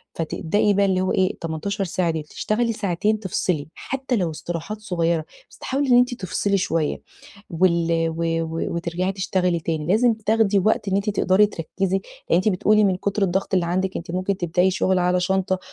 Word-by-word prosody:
فتبدئي 185 +5 0
بقى 200 0 +3
اللي 185 -1 +1
هو 185 - 0
إيه، 185 0 +2
ال18 175 +5 -3
ساعة 175 -2 0
ديّة 160 - -3
تشتغلي 230 +8 -1
ساعتين، 210 +1 0
تفصِلي 180 -6 -2
حتى 265 -1 -3
لو 180 -7 0
استراحات 170 +6 -5
صغيّرة، 170 -5 0 0.3
بس - - -16
تحاولي 275 +1 -2
إن 245 - +6
أنتِ 245 0 +3
تفصِلي 200 -1 -1
شوية 165 -4 -1 0.5
وال 170 -1 +2
و 170 - -1 0.2
و 165 +1 -3
وترجَعي 170 +3 -2
تشتغلي 180 -2 0
تاني، 160 -2 -3
لازم 230 +5 +4
تاخدي 220 -2 +2
وقت 210 +1 +1
إن 190 - +1
أنتِ 200 +2 0
تقدَري 195 0 +3
تركّزي 190 0 -2 0.3
لأن - - +4
أنتِ 195 +4 +2
بتقولي 210 +3 +3
من 195 -2 +3
كُتر 200 +1 -1
الضغط 190 +1 -1
اللي 180 -2 +2
عندِك 185 +2 -1
أنتِ 165 0 -7
ممكن 185 +1 -1
تبدئي 180 +1 +1
شُغل 185 0 +1
على 180 0 +2
شنطة 190 +1 0
185 Hz, 185 wpm, -22 LUFS, 170-205 Hz, 0.5 s, إن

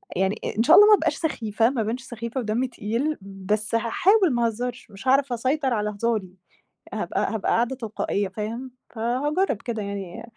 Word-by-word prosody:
يعني 190 +3 +1 0.2
إن 225 - +4
شاء 310 +7 +7
الله 415 +1 +9
ما 430 - +8
ابقاش - - 0
سخيفة 225 -7 0
ما 255 -4 -1
ابانش 230 +4 -2
سخيفة 235 +1 -5
ودمي 235 +3 0
تقيل، 245 +6 -2
بس 200 +3 -2
هاحاول 350 - +3
ما 235 -1 +1
اهزرش 240 0 -4
مش 200 +6 -10
هاعرف 270 -1 +3
اسيطر 260 +2 0
على 210 -1 0
هزاري 210 -2 -1 0.6
هابقى - - -1
هابقى 210 - -1
قاعدة 240 +3 +1
تلقائية 215 -4 -2
فاهم، 225 +6 -5 0.2
فهاجرب 260 - 0
كده 225 -3 -4
يعني، 200 +1 -6
230 Hz, 170 wpm, -24 LUFS, 215-260 Hz, 0.6 s, الله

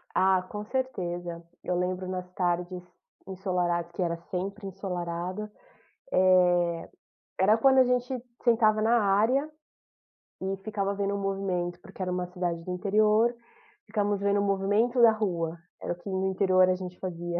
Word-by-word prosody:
Ah, 190 -1 +4
com 210 +3 -7
certeza. 175 -9 -3 0.2
Eu 180 - -1
lembro 185 +1 -2
nas 180 -1 -4
tardes 180 0 -1 0.4
ensolarados, 180 -3 -1
que 185 - -4
era 170 -1 0
sempre 195 +3 -4
ensolarado, 185 +1 -4 0.6
eh, 180 -1 +5 0.8
era 205 +3 +5
quando 265 +3 +5
a 260 - +8
gente 250 0 0 0.2
sentava 220 -3 +4
na 230 +2 +4
área, 220 +9 +2 0.9
e 190 +1 -2
ficava 200 -2 -1
vendo 200 0 -1
o - - -1
movimento, 190 -3 -2
porque 195 - -11
era 180 -1 -1
uma 180 0 -1
cidade 175 -2 -3
do 180 - -5
interior, 215 +5 +3 0.5
ficamos 205 -2 -1
vendo 200 0 +2
o - - +1
movimento 205 +5 +2
da 230 -1 +8
rua, 170 -6 -2 0.2
era - - -3
o - - -9
que 175 - -14
no 190 0 0
interior 185 -1 +4
a 185 - +3
gente 180 -1 -7
fazia, 175 -1 -3
190 Hz, 155 wpm, -28 LUFS, 180-210 Hz, 0.9 s, a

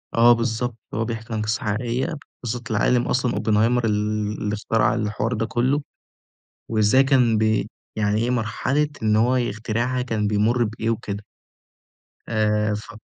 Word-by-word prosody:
آه، 120 +1 +7
بالضبط 115 0 -2 0.2
هو 110 +2 -1
بيحكي 115 0 -5
عن 110 - -1
قصة 110 +1 -1
حقيقية 120 +7 -1 0.3
قصة 120 0 -3
العالِم 120 +3 +2
أصلًا 125 -1 +1
Oppenheimer 110 +3 +2
اللي 105 0 -1
اخترع 110 +1 +1
الحوار 110 +1 -1
ده 115 -1 -1
كله، 130 +6 +1 0.9
وإزاي 110 +4 +4
كان 125 -5 +3
ب 110 -1 +2 0.3
يعني 105 0 +1
إيه 120 - 0
مرحلة 125 +5 0
إن 105 -1 +3
هو 120 +4 +3
يخترعها 120 +2 -1
كان 110 -4 -1
بيمر 110 +4 +2
بإيه 110 +1 -2
وكده 105 -2 -4 1.0
آآ، 105 -1 +1
ف 105 +2 -8
110 Hz, 140 wpm, -23 LUFS, 105-120 Hz, 1.0 s, آه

